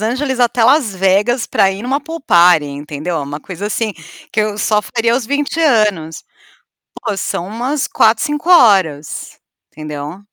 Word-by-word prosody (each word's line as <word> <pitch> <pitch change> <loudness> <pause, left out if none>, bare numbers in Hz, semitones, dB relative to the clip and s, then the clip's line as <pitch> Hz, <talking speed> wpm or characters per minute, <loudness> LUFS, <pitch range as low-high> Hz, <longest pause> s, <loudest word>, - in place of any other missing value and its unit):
Angeles 255 +4 -2
até 240 -1 +2
Las 255 -5 +3
Vegas 200 +6 +1
para 195 - +2
ir 195 - -6
em - - -8
uma 270 +3 -1
pool 330 +1 -8
party, 175 - +4
entendeu. 145 +4 -5
É - - -1
uma 145 +2 -6
coisa 190 +2 -6
assim 215 0 -2 0.4
que 220 - +1
eu 210 -1 -2
só 210 0 +1
faria 230 +1 -1
aos 245 -3 -2
20 285 +3 -2
anos. 210 - +1 0.8
Pô, 210 -4 -3
são 180 -2 -3
umas 250 +7 -2
4, 220 0 +2
5 295 +3 -3
horas, 190 - +3 0.3
entendeu? 150 +3 -7
215 Hz, 170 wpm, -16 LUFS, 175-250 Hz, 0.8 s, party